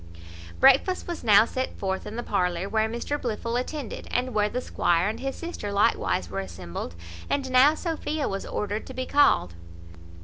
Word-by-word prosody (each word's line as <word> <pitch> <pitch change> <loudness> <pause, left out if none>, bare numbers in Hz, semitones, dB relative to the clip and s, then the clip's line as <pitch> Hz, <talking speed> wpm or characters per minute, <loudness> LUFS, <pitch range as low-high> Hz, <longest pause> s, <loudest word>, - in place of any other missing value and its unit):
Breakfast 270 +8 +4
was 345 -1 -5
now 215 -1 +7
set 260 +2 -4
forth 190 -1 -3
in 210 - -7
the 240 - -3
parlour, 180 -3 0
where 220 +1 +1
Mr 240 +6 -3
Blifil 230 0 -3
attended, 255 0 -4
and 250 0 -1
where 210 0 +2
the 250 - -2
squire 175 -7 +1
and 215 - -3
his 270 0 -3
sister 335 -12 -5
likewise 200 - +1
were 95 +2 -4
assembled; 85 -2 -6 0.3
and 270 -2 -1
now 265 +4 +6
Sophia 315 -3 -2
was 195 0 -3
ordered 210 +1 -3
to 260 - -9
be 255 0 -2
called. 280 - +3
230 Hz, 175 wpm, -26 LUFS, 195-265 Hz, 0.3 s, now